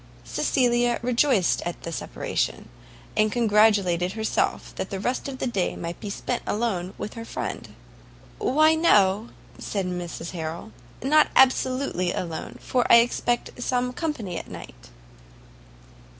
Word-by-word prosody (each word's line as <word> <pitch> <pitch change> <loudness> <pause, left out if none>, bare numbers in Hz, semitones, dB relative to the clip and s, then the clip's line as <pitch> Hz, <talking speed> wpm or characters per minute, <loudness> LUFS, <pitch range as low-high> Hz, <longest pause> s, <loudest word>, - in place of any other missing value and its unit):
Cecilia 240 -2 +1
rejoiced 245 -5 +2
at 175 - -5
the 170 - -5
separation, - - -3 0.5
and 215 0 +3
congratulated 205 -6 +3
herself 220 0 -1
that 190 - -5
the 195 - -4
rest 245 +8 -2
of 270 -1 -5
the - - -3
day 200 -7 -1
might 170 0 -6
be 210 - -6
spent 240 +4 -3
alone 195 -5 -1
with 210 - -5
her 230 - -7
friend. - - -5 0.7
"Why, 310 +4 +4
no," 210 - +3 0.3
said 195 -3 -3
Mrs 175 -2 -5
Harrel, 160 -7 -5 0.3
"not 300 +3 +5
absolutely 255 -7 +3
alone, 170 -3 -5
for 250 -2 0
I - - +10
expect 240 +1 +1
some 250 0 0
company 230 - -3
at - - -11
night." - - -11
220 Hz, 135 wpm, -25 LUFS, 180-250 Hz, 0.7 s, I